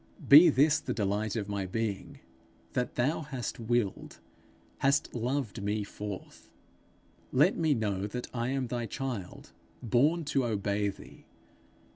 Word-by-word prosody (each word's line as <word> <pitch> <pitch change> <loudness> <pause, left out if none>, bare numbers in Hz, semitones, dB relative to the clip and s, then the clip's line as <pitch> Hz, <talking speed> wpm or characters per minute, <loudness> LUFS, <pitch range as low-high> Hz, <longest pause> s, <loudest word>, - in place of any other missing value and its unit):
Be 155 +5 +10
this 150 +2 +4
the 150 - -4
delight 105 0 -1
of 105 -3 -2
my 100 -2 -3
being, 105 0 -4 0.5
that 125 -1 -2
thou 135 +7 +1
hast 135 -7 -5
willed, 115 -3 -2 0.6
hast 140 +3 +2
loved 125 -3 -2
me 105 +1 -1
forth; 100 -1 -8 0.8
let - - +4
me 160 -3 +2
know 100 -3 -1
that 125 +4 -5
I 120 -1 -1
am 135 -1 -1
thy 120 -1 -3
child, 120 -10 -6 0.3
born 145 +9 +2
to 140 -2 +1
obey 100 -2 0
thee. 95 - -12
120 Hz, 135 wpm, -30 LUFS, 105-135 Hz, 0.8 s, Be